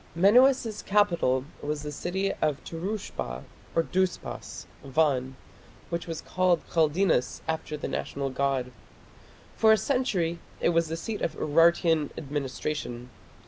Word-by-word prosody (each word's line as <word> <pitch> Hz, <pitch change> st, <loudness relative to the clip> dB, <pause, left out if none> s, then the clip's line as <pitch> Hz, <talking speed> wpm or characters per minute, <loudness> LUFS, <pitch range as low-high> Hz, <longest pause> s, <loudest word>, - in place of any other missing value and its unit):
Menuas's 230 Hz, +4 st, +4 dB
capital 170 Hz, -11 st, +2 dB, 0.2 s
was 150 Hz, 0 st, -3 dB
the 150 Hz, -, -4 dB
city 190 Hz, +6 st, -2 dB
of 150 Hz, -3 st, +2 dB
Turushpa 165 Hz, -, -4 dB, 0.3 s
or 165 Hz, -, +4 dB
Dhuspas 185 Hz, +1 st, -2 dB, 0.2 s
(Van), 135 Hz, -2 st, +1 dB, 0.6 s
which 170 Hz, 0 st, -3 dB
was 165 Hz, -2 st, -4 dB
called 180 Hz, -2 st, +1 dB
Khaldinas 160 Hz, -3 st, +2 dB
after 160 Hz, -1 st, -3 dB
the -, -, -4 dB
national 140 Hz, -1 st, -3 dB
god. 130 Hz, -2 st, 0 dB, 0.8 s
For 220 Hz, -1 st, +5 dB
a 220 Hz, -, +6 dB
century 195 Hz, -, 0 dB, 0.2 s
it -, -, +2 dB
was 165 Hz, -1 st, +2 dB
the 165 Hz, +1 st, -3 dB
seat 210 Hz, +6 st, -4 dB
of -, -, -1 dB
Urartian 165 Hz, 0 st, +3 dB
administration. 140 Hz, -3 st, -4 dB
165 Hz, 125 wpm, -27 LUFS, 145-185 Hz, 0.8 s, a